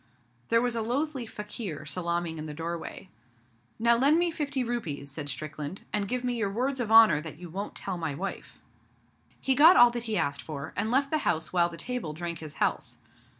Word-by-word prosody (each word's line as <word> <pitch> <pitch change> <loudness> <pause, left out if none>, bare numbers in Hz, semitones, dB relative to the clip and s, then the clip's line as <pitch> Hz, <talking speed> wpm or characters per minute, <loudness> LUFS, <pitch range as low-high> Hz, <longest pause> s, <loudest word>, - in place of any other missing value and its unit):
There 230 +1 +4
was 245 -1 0
a 230 - 0
loathly 260 +2 -2
fakir 210 -8 -5
salaaming 170 0 -2
in 155 - -5
the 150 - -7
doorway. 170 +3 -5 0.7
'Now 235 +1 +4
lend 280 +6 +4
me 345 0 +2
fifty 285 -4 -2
rupees,' 165 - -3
said 145 0 -5
Strickland, 155 +4 -5
'and 205 -1 +1
give 250 +3 -2
me 250 -1 0
your 220 -4 -1
Words 255 +6 -1
of 225 -3 -2
Honour 220 -9 +8
that 155 -2 -8
you 175 -1 -10
won't 200 +4 -5
tell 180 - -4
my 160 -4 -2
wife.' 195 +5 -6 0.8
He 270 - +2
got 320 +7 +8
all 240 0 +8
that 240 0 -4
he 220 -2 -1
asked 140 -1 0
for, 145 +1 -7
and 220 - -1
left 275 +3 +2
the 310 - +2
house 160 - -1
while 175 -1 +3
the 170 - -9
table 245 -10 -4
drank 170 +1 -4
his 155 -2 -8
health. - - -1
200 Hz, 205 wpm, -28 LUFS, 160-245 Hz, 0.8 s, Honour